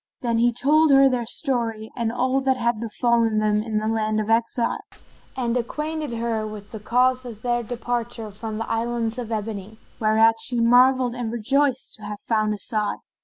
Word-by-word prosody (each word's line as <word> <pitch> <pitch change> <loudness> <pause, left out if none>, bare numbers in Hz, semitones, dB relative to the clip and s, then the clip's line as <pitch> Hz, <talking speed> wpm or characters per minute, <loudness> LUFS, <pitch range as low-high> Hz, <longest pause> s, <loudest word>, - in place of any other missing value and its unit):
Then 235 -3 0
he 240 +1 +4
told 300 +6 +3
her 275 -1 +7
their 245 -3 -1
story 230 -5 0
and 230 -2 -1
all 255 +2 0
that 265 -1 +1
had 235 -2 0
befallen 230 0 +1
them 210 0 +2
in 220 -1 -3
the 215 0 -1
land 215 -1 0
of 215 +1 -1
exile, 230 +1 +1 0.6
and 240 -2 -1
acquainted 300 +3 -3
her 225 -2 -2
with 210 -1 -9
the 220 - -7
cause 250 +4 +2
of 230 -4 -10
their 240 -1 0
departure 235 -1 -4
from 215 +1 -6
the 225 - -4
Islands 230 0 -2
of 235 -2 -6
Ebony, 215 -1 -4 0.2
whereat 225 +1 +4
she 245 -2 0
marvelled 250 +1 +4
and 240 -2 -4
rejoiced 260 +3 0
to - - -19
have 205 0 -6
found 215 -2 0
As'ad. 210 0 -2
235 Hz, 180 wpm, -23 LUFS, 220-245 Hz, 0.6 s, her